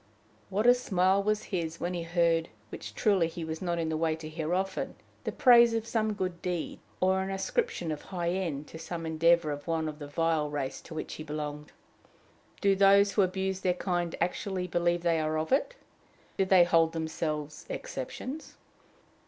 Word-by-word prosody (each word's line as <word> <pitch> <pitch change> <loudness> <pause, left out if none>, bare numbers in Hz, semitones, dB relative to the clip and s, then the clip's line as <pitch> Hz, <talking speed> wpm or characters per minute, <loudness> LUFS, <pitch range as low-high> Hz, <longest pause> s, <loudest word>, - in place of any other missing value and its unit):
What 205 +3 0
a 245 - +9
smile 195 -5 +2
was 210 +1 0
his 170 -2 -2
when 175 +1 -2
he 175 - -2
heard, 165 -1 +1 0.2
which - - -8
truly 195 -7 +3
he 165 0 -6
was 160 0 -5
not 175 -2 -1
in 165 -1 -1
the 160 - -1
way 160 0 +1
to 160 -1 -8
hear 155 +1 -4
often, 190 0 -2 0.3
the - - -1
praise 235 -2 +6
of 225 -1 -1
some 220 -2 0
good 185 -4 -3
deed, 175 -3 -3 0.2
or 190 +1 +3
an 190 - -3
ascription 195 - -1
of 150 - -4
high 175 -3 -3
end 165 -6 -2
to 160 - -9
some 165 0 -5
endeavor 160 0 +3
of 145 0 -6
one 160 -1 0
of 150 0 -6
the 145 - -7
vile 160 0 0
race 145 -2 -3
to 160 - -10
which 155 - -5
he 155 - -6
belonged! 150 -1 -5 0.9
Do 200 -1 +4
those 200 +1 +6
who 200 - +3
abuse 190 0 0
their 180 -1 +1
kind 175 -2 -1
actually 180 +2 -1
believe 175 0 0
they 165 -2 +2
are 155 0 0
of 155 0 -2
it? 295 - +2 0.6
Do 195 - +2
they 185 -2 +6
hold 165 -1 +3
themselves 155 -2 -3
exceptions? 315 - -6
175 Hz, 190 wpm, -29 LUFS, 160-190 Hz, 0.9 s, a